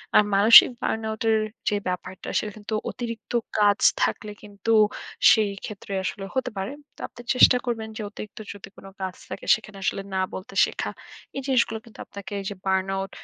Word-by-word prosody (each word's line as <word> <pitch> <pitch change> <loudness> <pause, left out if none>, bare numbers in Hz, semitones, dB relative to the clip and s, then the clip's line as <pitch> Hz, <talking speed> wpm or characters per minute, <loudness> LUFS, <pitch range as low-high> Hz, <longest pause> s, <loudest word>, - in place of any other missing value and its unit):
আর - - +8
মানসিক 210 +4 +9
burn 220 - -1
out 220 - -5
এর 220 - +4 0.3
যে 210 - 0
ব্যাপারটা। 180 +1 -5
সেটা 210 - -4
কিন্তু 215 +1 -7 0.2
অতিরিক্ত 230 -3 -7 0.3
কাজ 205 -1 +4 0.2
থাকলে 210 -1 -1
কিন্তু 205 +2 -4 0.6
সেই 215 -2 +3
ক্ষেত্রে 200 -1 -8
আসলে 195 +1 -4
হতে 255 -1 -1
পারে। 195 +6 -3 0.2
তো - - -22
আপনি 240 - -13
চেষ্টা 250 0 +7
করবেন 225 -2 -2
যে - - -4
অতিরিক্ত 210 0 -9
যদি 200 -1 -11
কোন - - -13 0.2
কাজ 190 -1 -3 0.2
থাকে - - -7
সেখানে 215 -2 -11
আসলে 195 - -1
না 190 - +1
বলতে 190 +1 -8
শেখা। - - -4 0.5
এই 275 - -2
জিনিসগুলো 235 -4 +2
কিন্তু 230 - -16
আপনাকে 200 0 -10
এই 195 - -7
যে 205 - -6
burn 190 0 +1
out 195 0 -3
210 Hz, 185 wpm, -25 LUFS, 195-225 Hz, 0.6 s, মানসিক